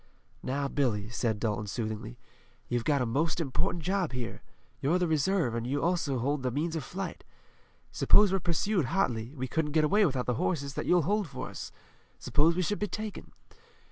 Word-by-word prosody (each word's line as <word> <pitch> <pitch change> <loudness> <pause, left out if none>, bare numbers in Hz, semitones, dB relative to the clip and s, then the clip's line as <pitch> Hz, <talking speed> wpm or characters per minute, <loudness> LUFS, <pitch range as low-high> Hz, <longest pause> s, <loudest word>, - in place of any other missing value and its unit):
"Now, 140 +2 -1
Billy," 115 -8 0
said 115 -2 -1
Dalton 105 -1 -1
soothingly, 110 - -4 0.5
"you've 120 -1 0
got 140 -2 +2
a - - 0
most 150 +9 0
important 165 +3 -1
job 185 -4 0
here. 125 -2 -4 0.4
You're 155 +6 +2
the 180 -1 +1
reserve, 160 -3 +2
and 115 0 -2
you 140 +2 -1
also 170 -6 +1
hold 140 +4 0
the 130 - 0
means 155 +6 -1
of 160 - -2
flight. 190 +8 -5 0.7
Suppose 205 -2 +5
we're 195 - +2
pursued 175 0 +1
hotly, 120 -5 -1
we 130 -1 -3
couldn't 150 +2 -1
get 155 -1 +4
away 205 +8 +4
without 130 -4 -1
the 125 - +1
horses 140 -5 -1
that - - -4
you'll 175 -2 +4
hold 205 +3 +1
for 130 -3 -6
us. - - -7 0.5
Suppose 160 +3 +3
we 185 - +1
should 205 +5 -1
be 210 - 0
taken. 215 0 -6
145 Hz, 190 wpm, -30 LUFS, 125-175 Hz, 0.7 s, Suppose